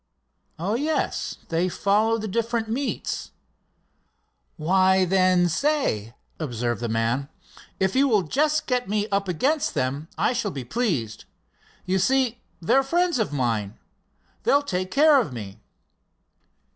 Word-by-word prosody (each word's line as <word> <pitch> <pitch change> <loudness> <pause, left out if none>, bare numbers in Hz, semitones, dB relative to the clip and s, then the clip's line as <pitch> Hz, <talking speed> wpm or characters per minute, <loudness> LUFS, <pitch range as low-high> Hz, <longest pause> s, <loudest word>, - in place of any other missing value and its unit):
"Oh, 185 +6 -2
yes, 295 +7 -1
they 170 +2 +1
follow 210 +5 +2
the 220 -1 -4
different 230 +2 -1
meets." 255 +5 -3 1.3
"Why, 185 +3 +3
then, 185 -1 +3
say," 165 - 0 0.2
observed 120 -6 -2
the 120 - -2
man, 115 +5 0 0.5
"if 190 +3 +1
you 275 +2 +4
will 215 -7 +3
just 300 - +1
get 250 -5 -1
me 210 0 0
up 200 0 0
against 275 - 0
them, 140 +5 -2
I - - +2
shall 235 -4 -1
be 135 -8 -6
pleased. 135 - -2 0.6
You 190 +1 +1
see, 250 +2 +1 0.2
they're 225 +11 +3
friends 340 +2 +1
of 215 - 0
mine. 115 -7 -1 0.6
They'll 285 +1 +3
take 185 -8 -2
care 290 +3 +5
of 170 - -5
me." 105 -2 -8
190 Hz, 135 wpm, -24 LUFS, -, 1.3 s, care